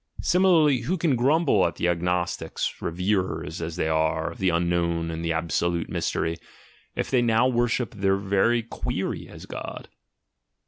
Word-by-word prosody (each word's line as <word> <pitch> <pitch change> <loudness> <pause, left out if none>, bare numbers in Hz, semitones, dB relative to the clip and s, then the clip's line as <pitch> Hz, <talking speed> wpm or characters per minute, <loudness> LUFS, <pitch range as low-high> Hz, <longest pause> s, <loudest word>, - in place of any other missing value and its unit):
Similarly, 170 -7 +4
who 170 +11 -1
can 160 -5 +2
grumble 135 - +3
at 85 - -5
the 85 - 0
agnostics, 90 0 -1
reverers, 90 -2 -1
as 80 0 -4
they - - -1
are, 80 +1 0
of - - -12
the 95 - +2
unknown 85 -1 0
and 80 0 -5
the 85 - 0
absolute 85 +1 -1
mystery, 80 0 -1 0.6
if - - -2
they 130 -2 +4
now 120 +1 +3
worship 120 -1 0
their 95 -2 +1
very 100 +4 +2
query 115 - -4
as - - -11
God? - - -7
95 Hz, 150 wpm, -25 LUFS, 85-120 Hz, 0.6 s, Similarly